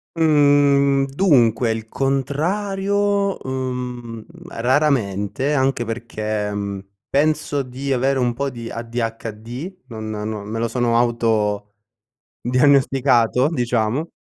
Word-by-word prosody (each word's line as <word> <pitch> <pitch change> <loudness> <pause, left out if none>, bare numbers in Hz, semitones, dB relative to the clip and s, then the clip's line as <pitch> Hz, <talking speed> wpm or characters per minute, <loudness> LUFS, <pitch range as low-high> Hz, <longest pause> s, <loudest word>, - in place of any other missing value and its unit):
Mhmm, 145 -3 +4
dunque 130 - +3
il 110 0 -4
contrario, 195 - 0
uhm, 125 -3 -4 0.2
raramente, 130 - 0
anche 130 -3 +1
perché, 110 -2 -3
mhmm, 100 -1 -3 0.3
penso 145 0 +1
di 135 +2 -3
avere 135 +2 +1
un 120 -2 +1
po' 140 +3 -2
di 120 -2 -8
ADHD, 115 - -5 0.2
non 110 -3 -7
no, 105 -1 -4
me 110 +2 -5
lo 115 - 0
sono 120 0 +1 1.3
autodiagnosticato, 130 -1 +2
diciamo 125 +1 -1
125 Hz, 95 wpm, -21 LUFS, 115-140 Hz, 1.3 s, Mhmm